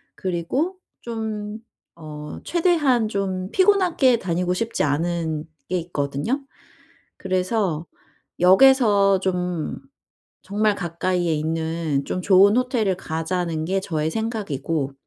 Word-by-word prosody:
그리고 195 - -2 0.2
좀 220 -2 -5 0.4
어 150 -1 -8
최대한 295 -10 +2
좀 190 -2 -3
피곤하게 360 - +3
다니고 180 0 -1
싶지 230 +5 -1
않은 160 +1 -1 0.3
게 185 - 0
있거든요. 160 - -2 0.8
그래서 185 -3 -1 0.6
'역에서 200 -1 +5
좀 180 -3 -2 0.7
정말 210 +2 +1
가까이에 175 -1 -1
있는 160 -2 -1
좀 185 - -3
좋은 200 +3 +5
호텔을 240 -7 +1
가자.'는 165 -1 -3
게 195 +1 0
저의 160 -4 -2
생각이고 165 - -2
185 Hz, 225 characters per minute, -23 LUFS, 165-220 Hz, 0.8 s, 역에서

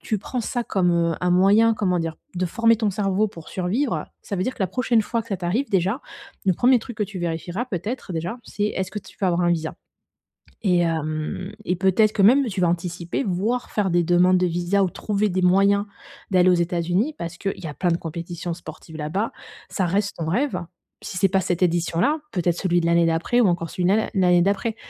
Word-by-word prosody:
tu 215 - -2
prends 245 +5 -4
ça 240 +1 -2
comme, 185 -5 +1
heu, 170 -1 +1
un 180 0 +1
moyen, 200 +5 +5
comment 180 -4 0
dire? 165 -1 -4 0.2
De 185 - 0
former 230 +5 +3
ton 215 -2 0
cerveau 200 +1 0
pour 165 -5 -12
survivre, 215 +9 -1 0.2
ça - - -5
veut 180 - 0
dire 255 - -2
que - - -19
la - - +2
prochaine 245 +1 +2
fois 230 +2 -2
que 230 - -19
ça 195 - -1
t'arrive, 190 +10 -1
déjà, 195 +7 +1 0.5
le 190 - +5
1er 250 +4 +4
truc 240 -1 -9
que - - +1
tu 195 -1 -8
vérifieras 175 +5 -3
peut-être, 205 0 -4
déjà, 170 +8 -3
c'est, 205 - -3
est-ce 190 -3 -3
que 210 - -3
tu - - -16
vas 195 - +2
avoir 175 0 +1
un 175 - +3
visa? 160 -2 -3 0.9
Et, 180 -4 +3
hem, 160 +3 -2
et 180 - +1
peut-être 190 +4 +3
que 205 - +1
même, 265 +6 +6
tu 195 -3 -4
vas 175 - +4
anticiper, 175 +5 -2
voire 210 +6 -1
faire 205 -3 0
des 175 0 +3
demandes 180 +2 +4
de 180 - +2
visa 175 +3 +1
ou 185 - +1
trouver 210 +2 -1
des 185 +1 -1
moyens 200 +2 +4 0.5
d'aller 185 0 +5
aux - - +5
États-Unis, 175 - 0
parce 170 0 -5
qu'il 195 -1 -2
y 165 - -4
a 150 - -6
plein 175 +5 +1
de 170 - +1
compétitions 170 +1 -5
sportives 165 -2 -11
là-bas. 170 +9 -2 0.4
Ça 185 - -1
reste 200 +3 0
ton 165 - -3
rêve. 250 - 0 0.4
Si 185 - -6
c'est 195 - +4
pas 190 0 +2
cette 180 -1 -2
édition-là, 175 - +1
peut-être 175 -2 0
celui 175 -2 +1
de - - -2
l'année 170 0 +4
d'après, 165 +9 +2
ou 225 - +4
encore 170 -2 0
celui 180 - -3
de - - +3
l'ann 210 +3 +4
à - - -2
l'année 180 -2 +4
d'après. 200 +4 0
185 Hz, 230 wpm, -23 LUFS, 175-210 Hz, 0.9 s, même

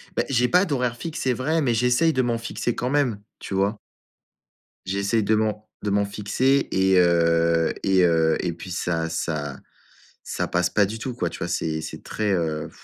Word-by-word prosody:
Bah, - - +2
j'ai 125 -2 +2
pas 180 +2 +4
d'horaires 125 -6 -1
fixes, 165 +4 -5
c'est 130 - +1
vrai, 155 +7 0
mais 125 -5 +1
j'essaye 125 +8 +3
de 130 -4 +1
m'en 120 -2 0
fixer 115 +1 -3
quand 125 - -2
même, 130 -8 +1 0.2
tu - - -7
vois? 100 +3 0 1.1
J'essaye 100 +3 0
de 110 +2 +2
m'en 105 0 -1
de 105 - -1
m'en 100 0 +2
fixer 125 +7 +1
et 95 0 +3
heu 85 -1 +3
et 95 -2 +3
heu 80 -2 +3
et 85 - -2
puis 85 +2 -9
ça 80 -2 -1
ça 75 -3 -3 0.6
ça - - -3
passe 90 +1 +1
pas 100 +1 +3
du 110 +3 -6
tout 125 0 -5
quoi, - - -1
tu - - -9
vois? - - -2
C'est 80 -1 -2
c'est 80 - -8
très, 105 -2 -2
heu. 80 -4 -1
100 Hz, 195 wpm, -24 LUFS, 85-125 Hz, 1.1 s, pas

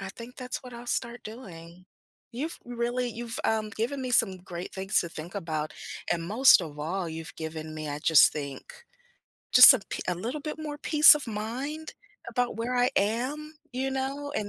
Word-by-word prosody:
I 195 - -6
think 235 +5 -11
that's 255 -1 -5
what 250 - -11
I'll 235 +1 -10
start 240 0 -3
doing. 180 -6 -11 0.5
You've 290 +8 -5
really 240 +1 -2
you've, 235 +1 -6
um, 215 -1 0
given 245 +5 -2
me 255 -1 -4
some 195 -6 +2
great 180 0 -8
things 190 +1 0
to 170 - -4
think 165 +3 -9
about, 155 -5 -3 0.4
and 170 -1 0
most 220 -1 +6
of 150 -2 -9
all, 175 +4 -3
you've 160 0 -8
given 160 -1 -6
me, 155 -1 -6
I 145 0 -4
just 160 -4 +6
think, 140 -3 -6 0.9
just 250 0 +12
a - - -1
p - - -4
a 180 - +1
little 235 - -5
bit 305 +2 -5
more 300 -1 -5
peace 300 +1 +7
of 295 -4 -5
mind 255 +9 -5 0.3
about 245 -3 -1
where 245 +2 -2
I 245 +2 +3
am, 260 +9 -1 0.2
you 265 +2 -2
know, 275 +2 -3
in 210 -6 -3
230 Hz, 190 wpm, -27 LUFS, 175-255 Hz, 0.9 s, just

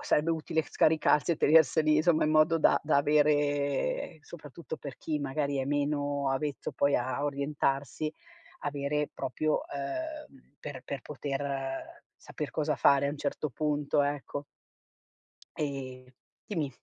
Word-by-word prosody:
sarebbe 155 +3 +2
utile 160 0 0
scaricarsi 155 +1 +3
e - - -2
tenerseli, 155 0 +5
insomma, 160 0 +3
in 155 - +2
modo 155 +2 +5
da 160 - +4
da 150 0 +2
avere 145 - +1
soprattutto 165 0 -9
per 140 -4 -8
chi 155 -2 -2
magari 140 0 -1
è 135 - 0
meno 145 0 0
avvezzo 135 +1 -2
poi 140 0 +1
a 130 +3 0
orientarsi, 140 +1 -1 0.5
avere 145 +1 -1
proprio, 155 0 -1
uhm, 305 - -5
mhmm, 130 - -24
per 145 -2 -7
per 140 - -4
poter 135 -2 -4
saper 150 -4 -6
cosa 155 -1 0
fare 140 0 +4
a - - 0
un 145 - -7
certo 150 0 -2
punto, 150 +2 0
ecco. 145 0 -3 1.1
Ehm 130 -3 -5 0.3
dimmi. 160 -9 -2
145 Hz, 135 wpm, -30 LUFS, 140-155 Hz, 1.1 s, tenerseli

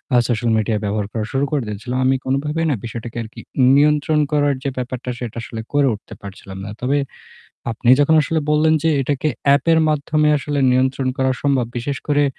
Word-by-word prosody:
আ - - +6
social 120 -1 0
media 110 0 0
ব্যবহার 105 0 -1
করা 110 -2 -3
শুরু 135 +1 +1
করে 145 -4 0
দিচ্ছিলাম। 110 +5 -4
আমি 130 +1 +3
কোনভাবেই 150 +5 -1
না - - +1
বিষয়টাকে 115 0 -7
আর - - -8
কি - - -9 0.3
নিয়ন্ত্রণ 150 +1 +3
করার 145 -1 +2
যে 140 - 0
ব্যাপারটা 125 0 -4
সেটা 120 -2 -6
আসলে 115 -1 -6
করে 145 -1 +3
উঠতে 105 - -10
পারছিলাম 100 -1 -10
না। - - -6
তবে 135 +3 +1 0.7
আপনি 115 +1 -3
যখন 145 +2 +4
আসলে 160 +2 -1
বললেন, 155 +1 +3
যে, 165 - +2
এটাকে 140 +2 -1 0.3
app 140 - 0
এর 160 - +5
মাধ্যমে 150 0 +1
আসলে 145 +1 -3
নিয়ন্ত্রণ 130 +1 +1
করা 130 0 +1
সম্ভব, 135 -4 +1
বিশেষ 135 +3 -3
করে 145 0 +3
135 Hz, 195 wpm, -19 LUFS, 120-145 Hz, 0.7 s, আ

